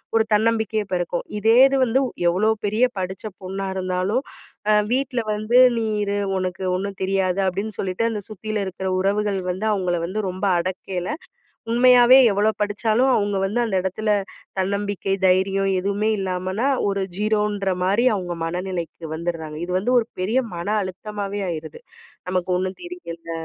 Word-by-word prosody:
ஒரு 225 - +5
தன்னம்பிக்கையும் 220 -1 +1
பெறக்கும். 175 -1 -1
இதே 225 +3 +4
இது 275 0 0
வந்து 250 +3 +2
வ் 250 - -5 0.2
எவ்ளோ 185 +5 +1 0.2
பெரிய 215 +4 +1 0.2
படிச்ச 185 +2 -5 0.2
பொண்ணா 190 +1 -4
இருந்தாலும் 185 +7 -1 0.5
அ - - +6 0.2
"வீட்ல 260 -1 0
வந்து 215 +3 +1 0.2
நீ 230 - 0 0.2
இரு. 200 0 -1 0.2
உனக்கு 185 0 -3
ஒன்னும் 195 +1 -4
தெரியாது" 190 0 +1
அப்படின்னு 200 +3 -2
சொல்லிட்டு, 185 +3 -2
அந்த 220 -2 -3
சுத்தியிலும் 215 0 -3
இருக்கிற 190 0 -5
உறவுகள் 200 +1 +1
வந்து 185 +4 -2
அவுங்கள 180 -4 0
வந்து 190 +5 -3
ரொம்ப 185 +2 -3
அடக்கையில, 185 0 -4 0.6
உண்மையாவே 250 +1 +7
எவ்வளோ 205 +2 +2
படிச்சாலும் 220 +5 +1
அவுங்க 205 -1 0
வந்து 210 +5 -1
அந்த 215 -4 -2
இடத்தில 210 +3 -1 0.5
தன்னம்பிக்கை, 200 0 -1
தைரியம் 195 +1 +2
எதுவுமே 200 +3 0
இல்லாமன்னா, 185 +5 -1 0.2
ஒரு 200 0 -1 0.2
0ன்ற 210 -2 0
மாரி 200 +6 +2
அவுங்க 175 -3 -4
மனநிலைக்கு 175 -1 -4
வந்திட்றாங்க. 160 -2 -4
இது 180 - -6
வந்து 210 +6 -1
ஒரு 230 - -2
பெரிய 210 +7 0 0.2
மன 170 +2 -5 0.2
அழுத்தமாவே 200 +2 -5
ஆயிருது. 160 - -6 0.5
"நமக்கு 185 0 -1
ஒண்ணும் 185 +1 -3
தெரியல" 170 - -8
195 Hz, 150 wpm, -22 LUFS, 185-215 Hz, 0.6 s, உண்மையாவே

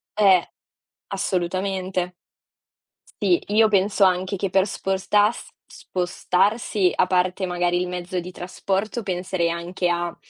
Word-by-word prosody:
Eh. 195 -4 +5 0.6
Assolutamente. 185 -1 -2 1.1
Sì, 350 -1 +3
io 220 +2 +4
penso 200 0 +2
anche 185 +1 +2
che, 195 0 -3
per 195 +1 +3
spostas 205 +3 0 0.2
spostarsi, 185 +2 0
a 180 - +3
parte, 185 +1 +1
magari, 175 0 0
il 180 - -1
mezzo 180 0 -4
di 175 +1 -7
trasporto, 195 +5 -3
penserei 180 -3 -1
anche 175 +2 -2
a, 175 0 -1
185 Hz, 115 wpm, -23 LUFS, 180-195 Hz, 1.1 s, Eh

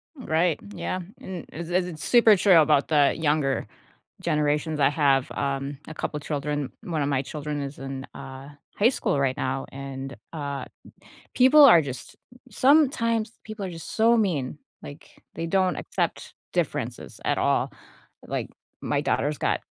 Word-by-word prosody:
Right, 170 - 0 0.2
yeah, 185 - -3 0.2
and 185 -3 -7
as 170 +1 -6
it's 175 -4 -1
super 230 -3 +6
true 185 -3 +6
about 150 -2 +3
the 145 -3 +4
younger 150 -3 +1 0.6
generations, 150 -1 0
I 140 - +5
have, 140 -3 +2
um, 140 0 -3
a 160 - -7
couple 150 -1 -4
children. 145 -1 -3
One 165 -7 -2
of 140 - 0
my 135 -2 +1
children 150 +1 -4
is 140 +1 -6
in, 135 0 -6
uh, 135 +1 -9 0.3
high 215 +4 +5
school 145 - -1
right 135 -2 +1
now, 135 +1 -2
and, 135 0 -7 0.2
uh, 140 -4 -4 0.7
people 275 +4 +7
are 175 - +8
just 130 -4 -7 0.3
sometimes 250 -7 +3
people 215 -2 -6
are 185 - -4
just 165 -1 -8
so 230 +1 +5
mean. 155 - -1 0.2
Like, 145 +1 -12
they 165 - -3
don't 185 +1 +1
accept - - -3 0.2
differences - - -3
at - - +1
all. - - +1 0.5
Like, - - -3 0.3
my - - 0
daughter's 145 +1 0
got - - 0
150 Hz, 150 wpm, -25 LUFS, 140-185 Hz, 0.7 s, are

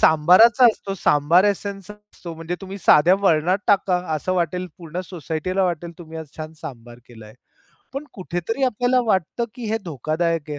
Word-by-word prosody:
सांबाराचा 185 - +6
असतो 200 -3 -1
सांबार 165 +1 +3
एसेन्स 200 -1 -2
असतो 210 -5 -11
म्हणजे 165 +2 -5
तुम्ही 195 0 -8
साध्या 175 0 +5
वरणात 180 0 +2
टाका 195 -2 +3 0.2
असं 155 +5 -2
वाटेल 180 +1 -1
पूर्ण 170 0 -6
सोसायटीला 180 +2 -3
वाटेल 170 -1 -3
तुम्ही 160 -2 -9
आज 160 - -7
छान 155 0 -7
सांबार 120 -2 -10
केलाय. 110 -3 -14 0.6
पण 275 +2 -5
कुठेतरी 185 +7 -4
आपल्याला 250 +1 +1
वाटतं, 195 +3 0
की 245 - -8
हे 225 - 0
धोकादायक 160 +1 -2
आहे. 145 - -4
175 Hz, 160 wpm, -22 LUFS, 155-200 Hz, 0.6 s, सांबाराचा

